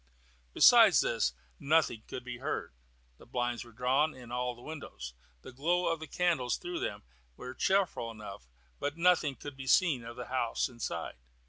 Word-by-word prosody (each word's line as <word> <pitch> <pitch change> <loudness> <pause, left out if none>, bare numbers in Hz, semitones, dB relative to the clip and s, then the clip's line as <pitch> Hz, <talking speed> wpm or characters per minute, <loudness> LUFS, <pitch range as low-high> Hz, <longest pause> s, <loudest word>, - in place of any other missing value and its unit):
Besides - - +8
this, - - 0 0.3
nothing 150 -6 +2
could 125 - -6
be 120 -1 -7
heard. - - -3 0.5
The - - -16
blinds 120 -1 -2
were 120 - -15
drawn 130 +6 +1
in 125 -2 -12
all 125 0 -2
the 120 - -15
windows. 140 - -8 0.3
The - - -9
glow 170 +8 +1
of 165 - -5
the 160 - -7
candles 165 -10 +1
through 175 0 -5
them - - -4 0.3
was 125 +1 -8
cheerful 190 -11 +1
enough, 105 - -9 0.3
but 145 +2 -3
nothing 170 -5 +3
could 145 0 -9
be 135 0 -8
seen 145 -4 +3
of 120 0 -8
the 125 - -6
house 125 -3 0
inside. 95 - -5
130 Hz, 170 wpm, -31 LUFS, 120-155 Hz, 0.5 s, Besides